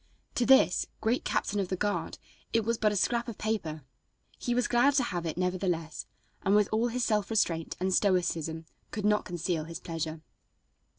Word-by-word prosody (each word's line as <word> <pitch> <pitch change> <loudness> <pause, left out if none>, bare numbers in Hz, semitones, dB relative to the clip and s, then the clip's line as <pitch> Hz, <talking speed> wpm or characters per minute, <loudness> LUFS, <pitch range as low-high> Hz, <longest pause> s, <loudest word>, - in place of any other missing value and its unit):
To 240 - +1
this 265 -8 +5
great 230 +4 0
Captain 205 - 0
of 195 - 0
the 185 - -1
guard 205 +2 -2 0.4
it 225 -2 +2
was 230 0 0
but 215 -1 +3
a - - -2
scrap 235 +5 +1
of 235 - -6
paper. 170 -9 -2 0.6
He 245 - -1
was 250 - +2
glad 250 +4 +4
to 270 - +4
have 175 -7 -3
it 160 - -4
nevertheless, 180 -3 -1 0.3
and, 195 +1 +3
with 210 -1 +4
all 225 +2 +2
his 245 +1 -1
self 210 -2 +1
restraint 170 -7 0
and 185 +1 0
stoicism, 170 -5 +1 0.2
could 210 -2 -4
not 210 0 +3
conceal 175 -2 -2
his 165 +1 -7
pleasure. 165 -2 -4
200 Hz, 185 wpm, -29 LUFS, 170-225 Hz, 0.6 s, this